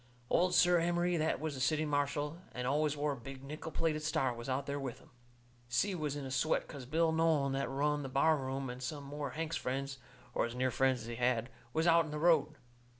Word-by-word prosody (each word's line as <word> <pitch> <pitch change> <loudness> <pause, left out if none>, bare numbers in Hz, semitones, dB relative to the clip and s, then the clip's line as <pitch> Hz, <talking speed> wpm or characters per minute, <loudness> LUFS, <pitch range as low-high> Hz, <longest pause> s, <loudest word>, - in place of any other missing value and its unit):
Old 180 0 +3
Si 175 - +6
Emery, 175 0 +2
that 160 0 +1
was 155 -1 -3
the 130 - -5
city 155 +4 +2
marshal, 145 +2 -1
and 125 - -3
always 150 +2 +1
wore 145 +1 0
a - - -2
big 135 +2 -9
nickel 150 +3 -6
plated 155 0 0
star, 135 -4 +1
was 120 +2 -7
out 130 +1 -1
there 140 0 -3
with 130 -4 -5
'em. - - -20 0.6
Si 155 +12 +1
was 150 -5 -2
in 145 -2 -5
a 130 - -5
sweat, 135 +5 +1
'cause 135 -4 -8
Bill 160 +3 +2
Nolan, 160 -4 +2
that 135 0 -1
run 145 +2 +1
the 135 - -5
bar 150 +5 +4
room, 135 -1 -3
and 125 +1 -6
some 140 +3 -4
more 145 +1 -4
of 130 - -8
Hank's 165 0 -2
friends, 135 +1 -3 0.3
or - - +1
as 120 - -8
near 130 0 +1
friends 130 -1 +2
as - - -8
he 115 0 -5
had, 120 0 +1 0.2
was 160 +3 +1
out 170 -1 +5
in - - -7
the 150 - -4
road. 155 -2 +3
145 Hz, 240 wpm, -34 LUFS, 130-155 Hz, 0.6 s, Si